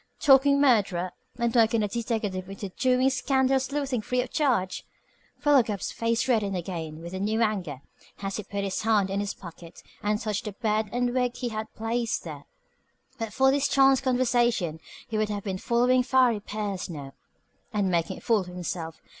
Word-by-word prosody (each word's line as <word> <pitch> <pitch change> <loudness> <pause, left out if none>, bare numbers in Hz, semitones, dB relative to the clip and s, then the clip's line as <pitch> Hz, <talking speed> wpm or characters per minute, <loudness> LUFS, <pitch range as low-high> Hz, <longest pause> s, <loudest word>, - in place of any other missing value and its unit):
Talking 280 0 +5
murderer 195 -10 +2 0.3
and 235 -1 0
working 225 -2 +3
a - - +1
deteckative 205 -4 -3
into 195 0 -6
doing 255 +5 +2
scandal 265 0 +2
sleuthing 270 -2 -2
free 250 +4 0
of 250 - -10
charge! 240 -11 0 0.5
Philo 290 -2 +5
Gubb's 210 -4 -3
face 230 +1 0
reddened 210 -6 +1
again 165 -3 -5
with 170 +2 -7
new 205 +4 -1
anger 180 - -2 0.4
as 195 0 -2
he 215 - -4
put 200 +1 -4
his 195 -1 -2
hand 210 -3 +2
in 195 - -1
his 205 0 -3
pocket 170 -2 -12 0.2
and 210 0 0
touched 215 -3 -3
the 210 - -4
beard 215 -1 -1
and 245 0 0
wig 250 -1 0
he 245 -1 -3
had 215 -1 -5
placed 230 +1 -1
there. 150 -4 -8 0.7
But 225 -2 -3
for 265 +4 +4
this 280 0 +2
chance 270 -1 +4
conversation 240 - +1 0.3
he 220 -2 -2
would 215 0 0
have 205 -1 -3
been 190 -2 -3
following 250 +2 +3
Farry 250 -3 +3
Pierce 205 -3 -4
now, 140 -5 -7 0.6
and 205 -4 0
making 170 -2 0
a - - -12
fool 225 -2 +3
of 185 - -5
himself. 175 -2 -5
215 Hz, 180 wpm, -27 LUFS, 190-250 Hz, 0.7 s, Talking